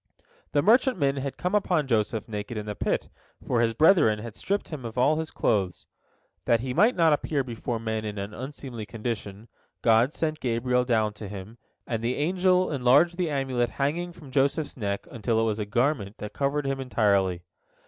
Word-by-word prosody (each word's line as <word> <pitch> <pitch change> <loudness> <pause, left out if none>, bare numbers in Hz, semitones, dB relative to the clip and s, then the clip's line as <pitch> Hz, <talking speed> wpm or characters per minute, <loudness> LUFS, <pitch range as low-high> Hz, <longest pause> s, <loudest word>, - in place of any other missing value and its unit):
The 145 -1 +3
merchantmen 205 - +3
had 135 0 -4
come 180 +2 -2
upon 180 -7 +2
Joseph 110 -3 0
naked 105 +1 -5
in 105 - -4
the 105 - -3
pit, - - -1 0.4
for 120 -2 +1
his 115 -1 +1
brethren 155 - +5
had 110 0 -8
stripped 200 +1 -2
him 150 -5 -6
of 115 +1 -7
all 145 +5 +3
his 160 0 -3
clothes. 95 -4 0 0.6
That 115 -1 +3
he 130 0 -3
might 220 - +4
not 165 -3 +4
appear 145 -1 0
before 120 -1 -4
men 110 -1 -2
in 105 -1 -5
an 100 +1 -5
unseemly 130 -3 -7
condition, 110 -2 -5 0.4
God 115 +3 +4
sent 155 -1 -2
Gabriel 125 +1 +1
down 110 -4 +1
to 105 0 -8
him, 105 +4 -9 0.3
and 115 -2 -3
the 120 +2 0
angel 180 +3 +2
enlarged 140 +6 +4
the 180 -3 0
amulet 130 -4 -1
banging 165 +6 -1
from 150 -5 -13
Joseph's 140 +3 +1
neck 100 -4 -3
until 115 -1 0
it - - +2
was 110 -1 0
a 105 - -1
garment 120 -2 0
that 105 - -7
covered 140 +1 -1
him 135 0 -1
entirely. 100 -8 +1
125 Hz, 190 wpm, -26 LUFS, 110-150 Hz, 0.6 s, brethren